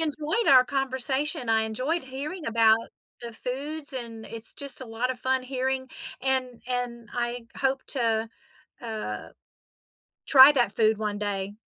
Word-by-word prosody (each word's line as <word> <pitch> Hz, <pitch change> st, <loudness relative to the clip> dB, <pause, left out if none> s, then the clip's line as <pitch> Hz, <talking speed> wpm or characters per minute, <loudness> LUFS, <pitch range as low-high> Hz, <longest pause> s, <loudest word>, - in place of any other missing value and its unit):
enjoyed 315 Hz, +8 st, -1 dB
our 255 Hz, -1 st, +8 dB
conversation. 265 Hz, 0 st, -2 dB
I 220 Hz, 0 st, +3 dB
enjoyed 255 Hz, +9 st, -2 dB
hearing 290 Hz, +6 st, -6 dB
about 225 Hz, 0 st, +3 dB, 0.3 s
the 235 Hz, -1 st, -6 dB
foods, 285 Hz, +6 st, -3 dB
and 230 Hz, -3 st, -6 dB
it's 230 Hz, -1 st, 0 dB
just 280 Hz, -1 st, 0 dB
a 260 Hz, -, -7 dB
lot 235 Hz, +3 st, -2 dB
of 250 Hz, -, -5 dB
fun 260 Hz, 0 st, 0 dB
hearing 260 Hz, 0 st, -2 dB, 0.3 s
and 260 Hz, -2 st, -1 dB
and 245 Hz, -2 st, -3 dB
I 240 Hz, -1 st, -3 dB
hope 270 Hz, 0 st, 0 dB
to, 225 Hz, -4 st, 0 dB, 0.5 s
uh, 220 Hz, -2 st, -5 dB, 1.0 s
try 270 Hz, 0 st, +9 dB
that 245 Hz, -7 st, +1 dB
food 220 Hz, -1 st, +2 dB
one 210 Hz, -1 st, -2 dB
day. 200 Hz, -1 st, -3 dB
250 Hz, 145 wpm, -26 LUFS, 225-270 Hz, 1.0 s, try